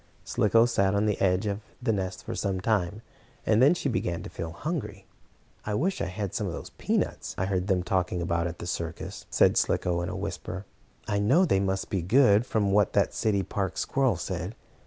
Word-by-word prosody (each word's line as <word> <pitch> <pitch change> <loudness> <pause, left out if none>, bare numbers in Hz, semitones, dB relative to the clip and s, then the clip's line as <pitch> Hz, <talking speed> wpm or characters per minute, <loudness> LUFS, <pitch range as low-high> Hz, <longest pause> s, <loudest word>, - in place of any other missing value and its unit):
Slicko 115 +2 +3
sat 100 -5 +2
on 100 +1 +2
the 105 -2 0
edge 95 +1 +2
of 100 0 -2 0.2
the 120 -3 +1
nest 95 -2 -3
for - - -5
some 95 -2 -1
time, 105 0 0 0.4
and 110 +1 +4
then 145 +7 +6
she 160 - -2
began 90 -9 -1
to - - -8
feel 85 - -5
hungry. 115 - -4 0.6
"I 105 - -2
wish 185 - 0
I - - 0
had 95 +1 -4
some - - -1
of - - -3
those - - -7
peanuts - - -2
I 95 - 0
heard 95 -1 -1
them 95 -3 +2
talking 90 0 0
about 85 0 0
in 85 - -5
the - - -7
circus," 85 -1 -5
said - - +4
Slicko 85 -1 +1
in 85 - -3
a 90 - -4
whisper. 95 +2 -5 0.4
"I 100 -1 0
know 135 - +4
they 95 - +2
must 95 0 -1
be 95 - 0
good, 110 +3 +4
from 105 -3 +1
what 100 -1 +3
that - - +2
city 100 -3 +1
park 95 0 -3
squirrel 135 -6 +1
said. 90 +4 -4
100 Hz, 210 wpm, -27 LUFS, 90-110 Hz, 0.6 s, then